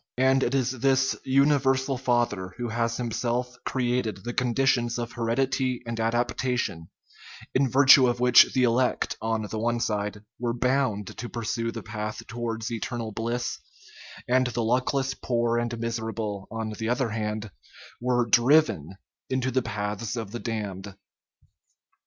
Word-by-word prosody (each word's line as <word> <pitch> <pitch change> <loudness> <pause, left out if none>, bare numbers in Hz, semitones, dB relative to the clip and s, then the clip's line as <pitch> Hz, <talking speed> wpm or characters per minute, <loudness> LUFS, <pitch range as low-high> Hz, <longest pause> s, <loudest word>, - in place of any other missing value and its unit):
And 130 +1 +4
it 135 - +1
is 130 -2 +1
this 135 +1 +2
" - - -31 0.2
Universal 135 -2 +2
Father 120 -8 0
" - - -26
who 120 -1 -3
has 115 +1 -1
himself 120 +1 -2
created 120 -6 -1
the 120 +1 -4
conditions 125 -1 +1
of 120 -1 -4
heredity 125 +2 -1
and 115 -1 -4
adaptation, 120 -5 -1 0.6
in 130 0 +2
virtue 135 0 +7
of 120 0 0
which 125 -1 +7
the 130 - +3
elect, 125 +1 +1
on 110 -1 -1
the 110 +1 -4
one 120 +1 0
side, 105 -2 -2 0.2
were 120 -1 -1
bound 125 -5 0
to 120 - -6
pursue 115 0 -2
the - - -7
path 105 0 -5
towards 115 -1 -4
eternal 115 -1 -4
bliss, 115 +3 -3 0.7
and 130 +1 +3
the 120 -1 -2
luckless 130 +3 +1
poor 120 -2 0
and 120 0 -2
miserable, 110 -3 -3
on 110 0 -4
the 110 +1 -4
other 125 0 +1
hand, 105 -1 -3 0.5
were 120 -1 +2
driven 120 - +3 0.3
into 130 0 0
the 130 +1 +2
paths 105 +1 -3
of 110 -4 -5
the 120 - -5
damned? 100 -4 -5
120 Hz, 150 wpm, -26 LUFS, 110-125 Hz, 0.7 s, virtue